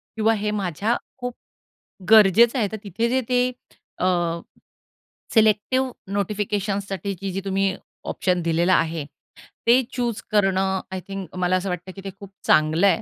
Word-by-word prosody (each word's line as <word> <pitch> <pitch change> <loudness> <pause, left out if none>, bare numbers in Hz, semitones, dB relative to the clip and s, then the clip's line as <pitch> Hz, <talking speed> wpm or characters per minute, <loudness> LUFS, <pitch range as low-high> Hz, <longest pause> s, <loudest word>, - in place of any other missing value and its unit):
किंवा 220 +1 +3
हे 210 0 -1
माझ्या 205 +3 -1 0.2
खूप 245 -1 -4 0.8
...गरजेचं 220 +3 +6
आहे, 210 - +2
तर 220 - -4
तिथे 210 +4 -1
जे 260 +1 +2
ते 250 0 +3 0.5
अ, 180 - +1 1.3
सिलेक्टिव 220 +4 +3 0.3
नोटिफिकेशन्ससाठीची 200 -1 -2
जी 195 - -3
तुम्ही 195 -1 +1 0.4
ऑप्शन 180 -2 0
दिलेलं 170 +2 +2
आहे 160 -4 +1 0.6
ते 250 +2 +6
चूज 240 -3 -2
करणं, 195 -2 +2
आय 190 - -3
थिंक 195 -3 -7
मला 180 0 +2
असं 185 +1 -1
वाटतं 180 +1 -5
की 195 - -9
ते - - -3
खूप 200 - -10 0.2
चांगलं 155 +5 +4
आहे. 225 - +2
200 Hz, 145 wpm, -23 LUFS, 185-220 Hz, 1.3 s, गरजेचं